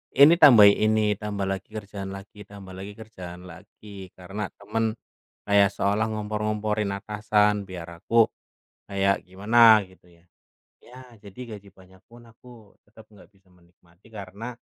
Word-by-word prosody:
ini 145 +4 +8
tambahin 110 -9 +8
ini, 110 0 +2 0.2
tambah 105 -2 -4
lagi 95 0 -5
kerjaan 100 -2 -7
lagi 100 +1 -13
tambah 100 -2 -12
lagi 100 +2 -8
kerjaan 90 -6 -11
lagi, 100 +4 -17 0.3
karena 95 +3 -6
teman 110 +2 -3 0.5
kayak 100 -1 +4
seolah 100 +2 -1
ngompor-ngomporin 105 -1 -2
atasan 105 0 0
biar 90 -3 -8 0.2
aku 115 -1 +3 0.6
kayak 100 0 -1
gimana 110 +4 +5
gitu, 95 -1 -23 0.2
ya. - - -32 0.6
Ya, 125 +2 -15 0.3
jadi 100 +5 -12 0.2
gaji 100 0 -16
banyak 95 -1 -20
pun 120 0 -16
aku 115 -2 -18
tetap 110 +1 -19
nggak 105 -3 -19
bisa 95 -1 -31
menikmati 90 +1 -27
karena, 110 +4 -9
105 Hz, 140 wpm, -24 LUFS, 95-110 Hz, 0.6 s, ini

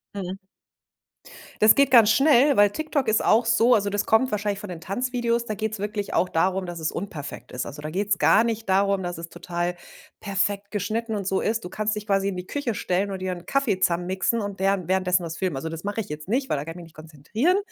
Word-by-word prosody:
Mhm. 190 -1 -4 1.2
Das 215 - +7
geht 280 -2 +3
ganz 230 -4 +7
schnell, 275 +2 +5
weil 205 0 +6
TikTok 300 -3 -2
ist 220 0 +2
auch 225 +2 +4
so 230 +2 +4
also, 200 -1 0
das 205 0 -1
kommt 240 +4 +3
wahrscheinlich 205 -1 -1
von 205 - -8
den 170 -2 -7
Tanzvideos, 235 +3 -1
da 215 - -3
geht's 220 +1 -3
wirklich 205 0 -4
auch 185 - +3
darum, 185 +3 0
dass 175 -1 -6
es 160 - -2
unperfekt 155 -7 -7
ist. 125 - -4
Also, 150 +2 -9
da 155 - -5
geht's 200 +1 0
gar 220 - +5
nicht 225 -2 -3
darum, 195 0 +2
dass 175 -1 -4
es 165 0 -7
total 175 0 -3 0.4
perfekt 200 0 -2
geschnitten 220 +3 -2
und 200 -2 -3
so 190 - +1
ist. 225 +1 -1
Du 180 - -6
kannst 215 +1 -2
dich 210 +1 -6
quasi 195 0 +1
in 190 - -4
die 180 0 -6
Küche 285 -6 -2
stellen 195 +1 -1
und 190 - -4
dir 185 0 -3
'n 175 0 -10
Kaffee 265 -9 0
zusammen 175 0 +1
mixen 190 +5 0
und 200 -2 -5
deren 195 -3 +1
währenddessen 185 -1 +1
was 165 0 -6
filmen. 185 -7 -1
Also, 160 +5 -4
das 165 +2 -7
mache 205 +2 -2
ich 195 - -9
jetzt 150 +2 -7
nicht, 265 +5 0
weil - - +1
da 140 - -3
kann 165 - -6
ich - - -10
mich 175 - -9
nicht 160 - -19
konzentrieren. 165 - -1
200 Hz, 245 wpm, -24 LUFS, 180-220 Hz, 1.2 s, Das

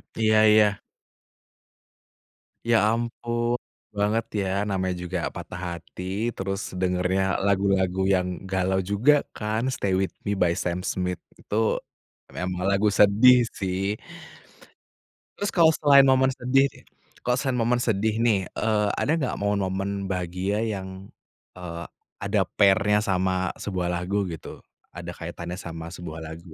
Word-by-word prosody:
Iya 110 -1 +4
iya. 105 -1 +5 1.9
Ya 115 -1 +4
ampun, 120 +1 -1 0.4
banget 105 +2 +1 0.2
ya 95 - -2 0.2
namanya 95 -2 -1
juga 90 +1 -3 0.2
patah 85 - -7
hati 85 +1 -8 0.3
terus 95 +1 -3 0.2
dengernya 90 +1 +1 0.2
lagu-lagu 95 -2 +1
yang 90 -1 +1 0.2
galau 95 0 +1
juga 115 +9 +5 0.2
kan 110 +4 -1
"Stay 95 -2 -1
with 95 0 +1 0.2
Me" 100 - 0
by 85 -1 +4
Sam 90 -1 -2
Smith 90 -2 -2 0.2
itu, - - -6 0.9
emang 90 0 -2
lagu 100 +2 +3
sedih 115 +4 +6 0.2
sih. 95 +2 -1 1.4
Terus 205 - -2
kalau 165 -3 +5
selain 140 -1 +6
momen 130 0 +4
sedih 135 +2 +2
deh - - -18 0.4
kalau 125 +1 +1
selain 130 -3 -1
momen 120 +1 +1
sedih 110 0 0
nih, 105 -5 +2
eee, 105 -2 +1
ada 145 - 0
gak 135 -6 -1
momen-momen 100 -1 -1
bahagia 95 +2 -2
yang, 95 -3 -5 0.5
eee, 85 -1 -6 0.4
ada 100 -1 +1
pair-nya 100 +1 +4
sama 95 -2 0
sebuah 90 -3 -3
lagu 90 +2 -1
gitu? 80 - -8 0.3
Ada 90 0 -7
kaitannya 85 +1 -6
sama 85 -2 -7
sebuah 85 -2 -8
lagu? 80 +1 -9
100 Hz, 130 wpm, -25 LUFS, 90-110 Hz, 1.9 s, sedih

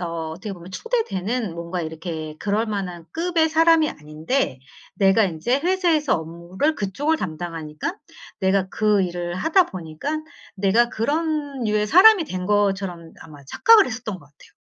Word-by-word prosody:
어 165 -2 -4
어떻게 190 +5 -6
보면 175 0 -12
초대되는 230 - -2
뭔가 170 +1 -4
이렇게 160 -1 -6
그럴 210 +2 0
만한 190 -6 -4
급의 330 -1 +1
사람이 325 -1 +4
아닌데 155 - -2 0.4
내가 195 +2 +4
인제 195 - -1
회사에서 340 -4 +2
업무를 170 - -2
그쪽을 290 +9 -1
담당하니까 165 - -5 0.4
내가 190 0 +1
그 210 -2 +2
일을 175 -1 -3
하다 325 - +3
보니깐 185 - -5 0.3
내가 205 +5 +3
그런 290 +3 -2
류의 210 -1 +1
사람이 370 - +7
된 185 -9 -5
것처럼 195 -5 -1
아마 145 -3 -13
착각을 455 -4 +6
했었던 220 -3 -5
것 165 - -18
같아요. 145 0 -21
200 Hz, 330 characters per minute, -22 LUFS, -, 0.4 s, 사람이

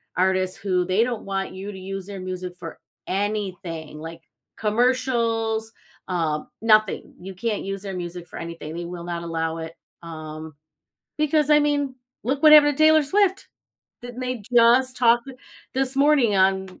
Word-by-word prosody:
artists 185 0 +1
who 185 -3 0
they 185 +5 +2
don't 240 -3 -3
want 195 -1 -3
you 195 +2 -6
to - - -9
use 195 0 -6
their 200 -1 -7
music 185 -1 -5
for 165 -2 -9 0.3
anything 185 -6 -3
like 165 +1 -8 0.4
commercials, 225 -1 0 0.4
um, 160 -4 -1
nothing. 215 -2 +2
You 190 +2 -8
can't 210 +2 -2
use 195 0 -4
their 195 -2 -6
music 175 0 -6
for - - -10
anything, 165 -2 -7
they 175 - -4
will 175 0 -7
not 170 -1 -4
allow 165 -1 -2
it. 160 +1 -7 0.3
Um, 155 -1 -8 0.6
because 305 -1 +2
I 300 0 +6
mean, 285 -2 0 0.3
look 270 +4 -1
what 305 -1 +7
happened 290 -2 +7
to 310 - 0
Taylor 315 0 +6
Swift. 390 +5 +1 0.6
Didn't 245 +1 -8
they 250 -3 -3
just 245 +2 +5
talk 240 -1 +5 0.5
this 270 0 -1
morning 275 -7 +4
on 190 0 +1
200 Hz, 160 wpm, -23 LUFS, 175-250 Hz, 0.6 s, what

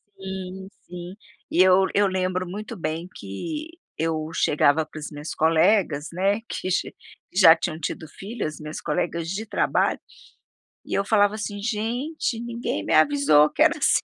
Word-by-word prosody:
Sim, 190 0 -7 0.2
sim, 175 +1 -8 0.4
e 175 - +4
eu 185 +1 +6
eu 205 0 +4
lembro 185 -1 -1
muito 210 +5 -6
bem, 165 -2 -4
que 300 - -6 0.3
eu 160 -1 -1
chegava 150 0 +3
para 155 - -10
as 150 - -6
minhas 150 +1 -6
colegas, 160 -1 +3
né, 195 +5 +1
que 185 - -3
xi - - -1 0.4
já 180 -3 +8
tinham 165 -1 -4
tido 160 +1 -4
filhas, 195 -2 -6
minhas 150 0 -7
colegas 165 +1 -2
de 210 +4 -3
trabalho, - - +1 0.9
e - - -6
eu 200 - +1
falava, 205 -1 +3
assim: 205 -1 -5
"Gente 240 +5 -2
ninguém 235 0 -3
me - - 0
avisou 280 - +5
que - - -4
era - - +5
assim. - - +3
185 Hz, 160 wpm, -24 LUFS, 160-210 Hz, 0.9 s, já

